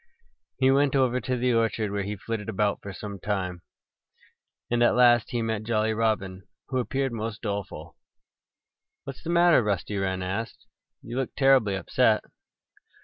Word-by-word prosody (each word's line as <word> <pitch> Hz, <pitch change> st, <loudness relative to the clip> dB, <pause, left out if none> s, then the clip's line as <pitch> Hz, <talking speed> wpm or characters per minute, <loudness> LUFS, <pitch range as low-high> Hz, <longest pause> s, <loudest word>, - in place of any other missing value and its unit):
He 130 Hz, 0 st, +4 dB
went 140 Hz, 0 st, +3 dB
over 125 Hz, -2 st, +2 dB
to 125 Hz, +3 st, -2 dB
the 125 Hz, 0 st, +1 dB
orchard, 115 Hz, -2 st, 0 dB
where 100 Hz, 0 st, -1 dB
he 100 Hz, +2 st, -4 dB
flitted 110 Hz, +2 st, -5 dB
about 105 Hz, -1 st, 0 dB
for 100 Hz, -, -7 dB
some 100 Hz, 0 st, -7 dB
time. 90 Hz, -3 st, -3 dB, 1.1 s
And 120 Hz, 0 st, +1 dB
at 120 Hz, -, +4 dB
last 120 Hz, -2 st, +5 dB
he 120 Hz, -1 st, -2 dB
met 110 Hz, -2 st, -2 dB
Jolly 110 Hz, 0 st, 0 dB
Robin, 105 Hz, -4 st, -1 dB, 0.3 s
who 130 Hz, -, 0 dB
appeared 135 Hz, +1 st, -1 dB
most 110 Hz, -1 st, -5 dB
doleful. 100 Hz, -3 st, -5 dB, 1.1 s
"What's 135 Hz, -1 st, -8 dB
the -, -, -7 dB
matter?" 170 Hz, -4 st, +5 dB
Rusty 105 Hz, -1 st, -2 dB
Wren 95 Hz, -1 st, -2 dB
asked. 100 Hz, +5 st, -5 dB, 0.4 s
"You 120 Hz, +2 st, -6 dB
look 135 Hz, -2 st, -3 dB
terribly 135 Hz, -7 st, +4 dB
upset." 95 Hz, -, +2 dB
110 Hz, 155 wpm, -26 LUFS, 100-125 Hz, 1.1 s, last